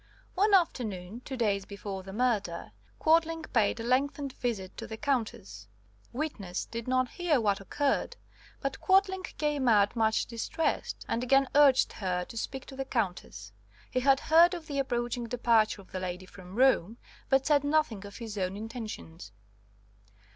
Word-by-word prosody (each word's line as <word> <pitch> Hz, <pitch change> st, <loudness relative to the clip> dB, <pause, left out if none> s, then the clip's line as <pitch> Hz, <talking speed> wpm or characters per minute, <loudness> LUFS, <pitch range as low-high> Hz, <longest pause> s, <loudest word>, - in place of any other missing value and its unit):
"One 405 Hz, +2 st, +4 dB
afternoon 220 Hz, -, -1 dB
(two 265 Hz, -, -5 dB
days 200 Hz, -4 st, 0 dB
before 200 Hz, -1 st, -6 dB
the 190 Hz, +1 st, -9 dB
murder) 210 Hz, -6 st, -1 dB, 0.3 s
Quadling 325 Hz, 0 st, +2 dB
paid 225 Hz, -1 st, +2 dB
a -, -, -4 dB
lengthened 275 Hz, +3 st, 0 dB
visit 210 Hz, -7 st, -3 dB
to -, -, -6 dB
the 220 Hz, -, -7 dB
Countess. 160 Hz, -, -3 dB, 0.4 s
Witness 235 Hz, -, -4 dB
did 230 Hz, 0 st, -6 dB
not 255 Hz, 0 st, +2 dB
hear 335 Hz, -1 st, +1 dB
what 205 Hz, -3 st, +1 dB
occurred, 280 Hz, +8 st, -1 dB, 0.4 s
but 275 Hz, -1 st, -3 dB
Quadling 380 Hz, 0 st, +3 dB, 0.2 s
came 295 Hz, -3 st, 0 dB
out 205 Hz, -1 st, +4 dB
much 220 Hz, -1 st, +2 dB
distressed, 240 Hz, +7 st, -2 dB
and 230 Hz, -, -1 dB
again 270 Hz, +2 st, +4 dB
urged 280 Hz, -3 st, +5 dB
her 180 Hz, -3 st, -2 dB
to -, -, -12 dB
speak 265 Hz, +4 st, -4 dB
to 270 Hz, -, -10 dB
the 270 Hz, -, -2 dB
Countess. 180 Hz, -, -3 dB, 0.4 s
He 255 Hz, -, +1 dB
had 270 Hz, +1 st, +4 dB
heard 335 Hz, +3 st, +5 dB
of 335 Hz, -2 st, -8 dB
the 285 Hz, -2 st, -3 dB
approaching 240 Hz, -2 st, -2 dB
departure 225 Hz, -4 st, +2 dB
of -, -, -24 dB
the 185 Hz, -, -3 dB
lady 185 Hz, 0 st, -5 dB
from 185 Hz, 0 st, -12 dB
Rome, 235 Hz, -4 st, +3 dB, 0.3 s
but 270 Hz, 0 st, +3 dB
said 290 Hz, -2 st, +3 dB
nothing 285 Hz, -9 st, +1 dB
of 200 Hz, 0 st, -10 dB
his 220 Hz, -4 st, -6 dB
own 185 Hz, +1 st, -2 dB
intentions. 215 Hz, -, -7 dB
240 Hz, 160 wpm, -29 LUFS, 200-275 Hz, 0.4 s, urged